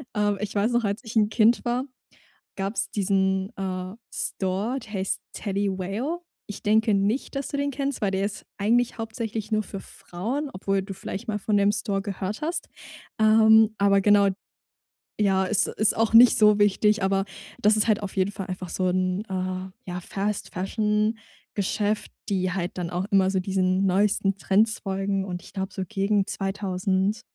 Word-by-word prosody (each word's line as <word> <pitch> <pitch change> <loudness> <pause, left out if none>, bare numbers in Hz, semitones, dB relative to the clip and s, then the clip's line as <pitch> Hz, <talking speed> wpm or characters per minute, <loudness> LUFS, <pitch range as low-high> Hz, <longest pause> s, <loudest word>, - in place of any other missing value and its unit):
Ähm, 205 -1 +1
ich 210 0 -4
weiß 205 +4 +2
noch, 240 -2 +1
als 200 +2 -2
ich 225 0 -4
'n 210 - +5
Kind 230 +3 +3
war, 245 +1 0 0.7
gab's 195 +3 -2
diesen, 190 -1 +1
äh, 185 -1 -4 0.2
Store, 200 +7 -1
der 225 -3 -12
heißt 190 0 -1
Teddy 200 -1 -1
Whale. 225 - -3 0.3
Ich 205 - -8
denke 220 0 +3
nicht, 205 +9 0
dass 275 0 -3
du 285 - -3
den 285 0 -1
kennst, 275 0 -2
weil 200 -3 0
der 195 +1 0
ist 205 +1 -5
eigentlich 235 +4 +2
hauptsächlich 225 -1 -4
nur 215 -1 +1
für 195 - -7
Frauen, 245 +16 -5
obwohl 195 +1 -1
du 195 0 -7
vielleicht 195 +1 -6
mal 210 -1 -2
von 205 +1 +1
dem 200 0 +4
Store 210 -2 -1
gehört 200 +3 -4
hast. 330 +2 -2 0.5
Ähm, 220 0 +6
aber 200 0 +4
genau 205 0 +5 0.9
ja, 190 -2 +3
ist 210 +1 +2
ist 215 - +1
auch 225 0 +1
nicht 235 +2 +8
so 210 -1 +6
wichtig, 205 +1 +3
aber 195 0 +1 0.4
das 210 +1 +4
ist 215 - +2
halt 215 0 +2
auf 200 - -6
jeden 190 +1 +2
Fall 195 -1 -6
einfach 185 -1 -5
so 185 - -1
'n, 185 +1 0
äh, 185 0 -3 0.2
ja, 180 0 -4
Fast 200 +3 -3
Fashion 210 +3 0 0.3
Geschäft, 205 +1 -1 0.2
die 185 -2 0
halt 180 -1 -3
dann 170 - -3
auch 180 +2 -2
immer 190 -1 +4
so 190 - +1
diesen 185 0 +1
neuesten 195 +1 +2
Trends 215 +3 +2
folgen. 195 0 -1
Und 180 -2 -5
ich - - -14
glaube, 190 0 -3
so 190 - -3
gegen 200 -1 +1
2.000 195 +1 -1
200 Hz, 180 wpm, -25 LUFS, 190-215 Hz, 0.9 s, nicht